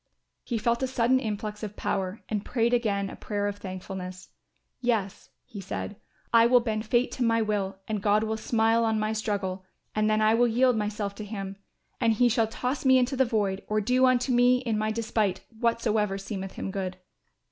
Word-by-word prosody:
He 235 - -2
felt 235 +2 0
a 260 - +1
sudden 255 0 +2
influx 210 -2 -4
of 210 -2 -6
power 190 +1 -2
and 210 -2 -2
prayed 235 -1 0
again 205 -5 +1
a - - -8
prayer 205 -1 -3
of 205 0 -2
thankfulness. 185 -1 -7 0.5
"Yes," 220 -5 -1 0.2
he 205 - -8
said, 195 +2 -5 0.4
"I 230 0 +7
will 250 +1 +6
bend 220 -2 -3
fate 240 +3 +2
to 255 - -2
my 230 -1 +3
will 200 -3 -1
and 215 -2 -2
God 210 +1 +3
will 220 0 -1
smile 225 +1 +2
on 220 -1 +1
my 215 +1 0
struggle 200 -4 -2 0.3
and 215 0 +1
then 215 0 +2
I 215 0 +4
will 240 +1 +4
yield 250 +2 +3
myself 210 -1 -2
to 215 - -5
Him 195 -2 -5 0.4
and 230 -2 +3
He 245 +3 +3
shall 225 -1 +2
toss 250 +4 -3
me 260 -1 +6
into 255 +2 +1
the 265 0 +3
void 205 -5 0
or 215 0 +1
do 250 +5 +3
unto 255 +1 +2
me 245 +1 +5
in 230 -4 -1
my 215 0 0
despite 215 -4 -1 0.2
whatsoever 220 -4 +1
seemeth 195 -1 -5
Him 195 - -5
good." 185 -2 -4
215 Hz, 200 wpm, -27 LUFS, 205-235 Hz, 0.5 s, I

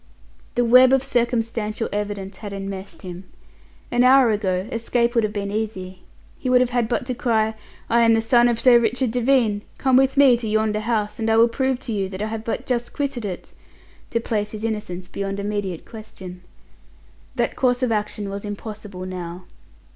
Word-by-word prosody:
The 245 - +2
web 255 +2 +7
of 270 -1 +3
circumstantial 230 -3 -1
evidence 205 -2 -4
had 205 -2 -7
enmeshed 195 0 -7
him. 180 0 -8 0.7
An 245 0 +3
hour 255 -2 +6
ago 190 -2 -1
escape 235 +1 0
would 230 -2 +2
have 215 - 0
been 200 -1 -3
easy. 190 -4 -4 0.4
He 255 - -2
would 250 0 +5
have 250 -1 +1
had 240 -2 0
but 245 - -1
to 255 - -2
cry, 220 -3 +1 0.3
"I 235 +1 +3
am 230 -1 +5
the - - +2
son 240 +1 +4
of 235 -1 0
Sir 240 0 +6
Richard 235 +2 0
Devine. 240 -4 +2 0.2
Come 265 -2 +2
with 270 +1 +3
me 270 -4 +6
to 230 -1 -5
yonder 215 0 +1
house, 215 0 -2
and 225 0 0
I 225 - +4
will 230 +1 +6
prove 265 +2 0
to 235 - -4
you 195 -2 -1
that 190 +1 -5
I 215 - -2
have 220 0 -5
but 225 - -3
just 240 -2 -2
quitted 275 -6 -3
it," 185 -3 -6 0.6
to 230 - 0
place 210 -2 -2
his 215 0 -6
innocence 210 -5 -4
beyond 195 +1 -4
immediate 200 -4 -3
question. 195 -5 -10 0.9
That - - 0
course 250 0 +1
of 250 - +1
action 210 -1 -2
was 200 0 -5
impossible 205 -2 -7
now. 180 -1 -7
220 Hz, 190 wpm, -22 LUFS, 205-240 Hz, 0.9 s, web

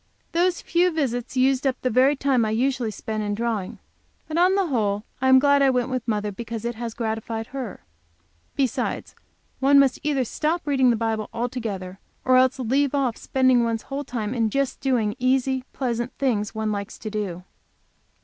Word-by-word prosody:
Those 350 +1 +1
few 350 +2 +2
visits 260 -6 -2
used 265 +1 +3
up 260 -1 -1
the 255 - +1
very 260 +5 +4
time 270 -3 +2
I 215 - 0
usually 245 +1 0
spend 215 +1 -4
in 205 -1 -2
drawing. 220 -4 -2 0.5
But 315 +1 -1
on 365 +2 +4
the 395 -1 +2
whole 210 - 0 0.2
I 260 - +3
am 260 - +8
glad 285 +1 +4
I 275 - +5
went 250 -1 +1
with 255 -2 -3
mother, 210 -2 -1
because 230 +2 -6
it 235 - -1
has 230 0 -6
gratified 225 -1 -3
her. 255 -7 -5 0.7
Besides, 265 -4 -1 0.5
one 275 +1 +5
must 275 -2 +4
either 280 -4 0
stop 315 +8 -1
reading 265 -3 +3
the 235 - +3
Bible 220 -1 -2
altogether, 220 -6 -4 0.3
or 255 - +5
else 260 +1 +4
leave 270 +3 +1
off 260 -5 +1
spending 260 -2 +2
one's 230 -1 -1
whole 280 +1 -4
time 235 -4 -3
in 230 -3 +1
just 275 +3 -1
doing 235 -6 +1
easy 260 0 +1
pleasant 240 -1 -2
things 220 -6 0
one 220 -1 -1
likes 200 0 -4
to 215 - -6
do. 195 -4 -4
250 Hz, 185 wpm, -24 LUFS, 220-270 Hz, 0.7 s, am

